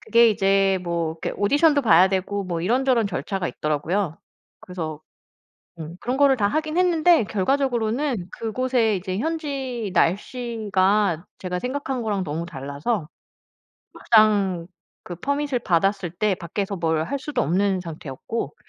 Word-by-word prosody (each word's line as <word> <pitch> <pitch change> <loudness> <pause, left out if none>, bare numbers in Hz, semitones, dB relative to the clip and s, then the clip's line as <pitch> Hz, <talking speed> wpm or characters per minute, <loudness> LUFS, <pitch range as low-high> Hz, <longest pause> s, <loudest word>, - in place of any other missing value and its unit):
그게 235 0 +5
이제 195 -2 +2
뭐 170 -2 -2
이렇게 160 - -5
오디션도 285 +7 +4
봐야 185 -3 +6
되고 195 +1 -1
뭐 175 -3 -3
이런저런 240 +4 +2
절차가 190 +1 -3
있더라고요. 155 +4 -2 0.4
그래서 160 -4 -6 0.8
음 160 +2 -7
그런 250 +2 -2
거를 280 -2 +5
다 205 -4 +2
하긴 310 +7 -1
했는데 345 -5 +4
결과적으로는 235 0 0
그곳에 230 0 +1
이제 185 0 -3
현지 275 - -3
날씨가 200 -2 +1
제가 180 -1 -3
생각한 260 +2 -3
거랑 205 -3 -1
너무 165 0 -4
달라서 150 - -3 0.8
막상 205 -6 +3 0.4
그 175 - -7
퍼밋을 280 - -1
받았을 195 -2 +1
때 205 +2 +1
밖에서 195 +3 -4
뭘 160 -2 0
할 280 +10 -3
수도 295 +2 -2
없는 190 +4 +1
상태였고 165 - -6
200 Hz, 300 characters per minute, -23 LUFS, 175-250 Hz, 0.8 s, 봐야